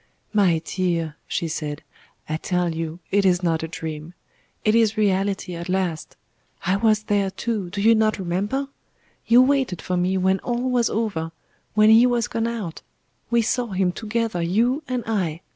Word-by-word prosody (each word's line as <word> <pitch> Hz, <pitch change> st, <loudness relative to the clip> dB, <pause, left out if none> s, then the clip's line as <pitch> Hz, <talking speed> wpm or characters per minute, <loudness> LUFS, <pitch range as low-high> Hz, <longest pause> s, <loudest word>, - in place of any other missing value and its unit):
"My 185 Hz, -6 st, +3 dB
dear," 170 Hz, -4 st, -1 dB
she 170 Hz, -, -2 dB
said, 150 Hz, -1 st, -4 dB, 0.4 s
"I 155 Hz, -, -2 dB
tell 180 Hz, 0 st, -1 dB
you 165 Hz, 0 st, -4 dB
it 200 Hz, 0 st, +3 dB
is 180 Hz, -1 st, +2 dB
not 165 Hz, -2 st, +1 dB
a 160 Hz, -, -3 dB
dream. 160 Hz, 0 st, -7 dB, 0.5 s
It 215 Hz, -, +4 dB
is 225 Hz, -1 st, +3 dB
reality 195 Hz, -2 st, 0 dB
at 170 Hz, +1 st, -6 dB
last. 180 Hz, -4 st, -2 dB, 0.5 s
I 185 Hz, +2 st, +2 dB
was 215 Hz, +1 st, +2 dB
there 205 Hz, -2 st, +1 dB
too 200 Hz, -1 st, -3 dB
do 200 Hz, +3 st, -4 dB
you 225 Hz, +1 st, +6 dB
not 220 Hz, -1 st, +2 dB
remember? 200 Hz, +9 st, -2 dB, 0.6 s
You 240 Hz, +2 st, +7 dB
waited 265 Hz, -9 st, +1 dB
for 180 Hz, -, -2 dB
me 185 Hz, +2 st, +1 dB
when 190 Hz, +1 st, +2 dB
all 245 Hz, +1 st, -2 dB
was 240 Hz, -2 st, +2 dB
over 200 Hz, -8 st, -2 dB, 0.4 s
when 215 Hz, 0 st, +6 dB
He 230 Hz, +3 st, +7 dB
was 240 Hz, -2 st, +1 dB
gone 230 Hz, 0 st, -1 dB
out 215 Hz, -8 st, -5 dB, 0.5 s
we 235 Hz, -1 st, +3 dB
saw 245 Hz, +2 st, 0 dB
Him 185 Hz, -1 st, +1 dB
together, 220 Hz, -2 st, -2 dB
you 230 Hz, -, +1 dB
and 250 Hz, -2 st, -2 dB
I. 180 Hz, -7 st, -1 dB
195 Hz, 175 wpm, -23 LUFS, 175-225 Hz, 0.6 s, You